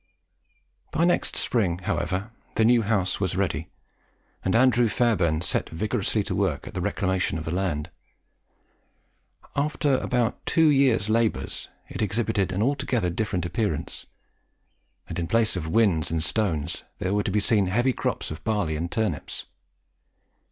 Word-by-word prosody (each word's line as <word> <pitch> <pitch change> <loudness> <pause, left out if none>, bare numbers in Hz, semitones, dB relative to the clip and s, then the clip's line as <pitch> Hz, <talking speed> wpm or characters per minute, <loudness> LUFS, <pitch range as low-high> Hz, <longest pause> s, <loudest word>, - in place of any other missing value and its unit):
By 165 +2 +1
next 175 - +1
spring, 95 -8 +1
however, 95 +4 -2 0.2
the 110 - +3
new 120 0 +5
house 100 -4 0
was - - -1
ready; - - -1 0.7
and 95 - +1
Andrew 120 -1 +4
Fairbairn 95 -10 +2
set 85 - -1
vigorously 90 +6 -1
to - - -3
work - - 0
at - - -9
the - - -3
reclamation 95 -3 0
of 80 - -5
the 80 - -2
land. 90 -4 -1 1.6
After 145 -2 +1
about 125 -2 -1
two 165 -2 +4
years' 135 -7 +3
labours 115 0 0 0.2
it - - -5
exhibited 105 -2 0
an 95 +3 0
altogether 130 -8 0
different 90 -1 -1
appearance, 100 -4 -2 1.0
and - - -4
in 85 - -2
place 115 0 +2
of 85 -3 -3
whins 90 -5 +2
and 80 -1 -1
stones 85 -3 -1
there 95 +2 -1
were 105 - +2
to 100 - -2
be 105 +2 +2
seen 100 -1 +2
heavy 120 +7 +2
crops - - -2
of 80 +2 -7
barley 105 -8 0
and 85 +3 -3
turnips. 110 -10 -2
105 Hz, 150 wpm, -25 LUFS, 85-115 Hz, 1.6 s, new